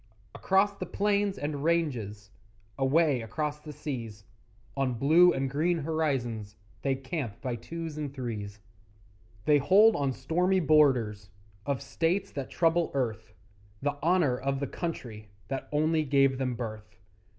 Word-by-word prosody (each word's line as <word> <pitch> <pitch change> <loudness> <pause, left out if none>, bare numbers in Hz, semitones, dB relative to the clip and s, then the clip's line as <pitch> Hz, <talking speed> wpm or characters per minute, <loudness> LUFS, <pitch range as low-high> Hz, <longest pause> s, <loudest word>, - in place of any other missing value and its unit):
Across 200 +1 +2
the - - -5
plains 205 -1 0
and 145 -1 -3
ranges, 120 -12 -1 0.4
Away 135 0 +2
across 150 +6 -3
the 150 0 -9
seas, 115 -9 -6 0.5
On 135 -3 0
blue 160 +8 +6
and 135 0 -1
green 160 +6 +1
horizons 135 -9 -2 0.3
They 135 -1 +1
camp 130 -4 -5
by 125 -3 -3
twos 160 +4 -6
and 145 -2 -3
threes; 105 -6 -6 0.8
They 150 -1 +5
hold 205 +10 +6
on 140 -2 0
stormy 180 +9 +1
borders 130 - +3 0.4
Of 140 -1 -1
states 165 +7 -1
that 140 -2 -5
trouble 165 0 +2
earth 110 -5 -2 0.5
The 145 0 0
honour 165 -7 +2
of 135 +1 -1
the 140 - -1
country 120 - -6 0.2
That 135 -1 -4
only 155 +1 +2
gave 135 -2 +3
them 130 -2 -1
birth. 110 -3 -7
140 Hz, 140 wpm, -29 LUFS, 120-165 Hz, 0.8 s, blue